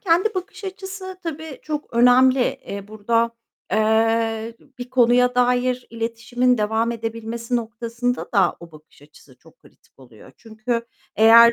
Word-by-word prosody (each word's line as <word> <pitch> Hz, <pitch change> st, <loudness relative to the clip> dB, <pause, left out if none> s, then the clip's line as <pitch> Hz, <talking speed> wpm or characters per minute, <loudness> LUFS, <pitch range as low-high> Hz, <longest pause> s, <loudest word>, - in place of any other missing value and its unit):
kendi 375 Hz, +4 st, +2 dB
bakış 375 Hz, +2 st, -6 dB
açısı 380 Hz, 0 st, -7 dB
tabii, 315 Hz, -3 st, -6 dB
çok 300 Hz, -3 st, -5 dB
önemli. 250 Hz, +2 st, +5 dB
Eee, 200 Hz, -4 st, -3 dB
burada, 230 Hz, +2 st, 0 dB, 0.4 s
eee, 225 Hz, +1 st, +1 dB, 0.2 s
bir 245 Hz, +1 st, -7 dB
konuya 250 Hz, 0 st, +4 dB
dair 250 Hz, 0 st, +1 dB
iletişimin 235 Hz, +2 st, 0 dB
devam 220 Hz, +2 st, 0 dB
edebilmesi 230 Hz, +1 st, -4 dB
noktasında 235 Hz, +2 st, -3 dB
da 190 Hz, -3 st, +3 dB
o 170 Hz, -1 st, -13 dB
bakış 155 Hz, -1 st, -18 dB
açısı 145 Hz, -3 st, -19 dB
çok -, -, -21 dB
kritik -, -, -25 dB
oluyor. 120 Hz, -5 st, -16 dB
Çünkü 230 Hz, +1 st, -4 dB, 0.3 s
eğer, 230 Hz, +1 st, +8 dB
235 Hz, 130 wpm, -22 LUFS, 220-250 Hz, 0.4 s, eğer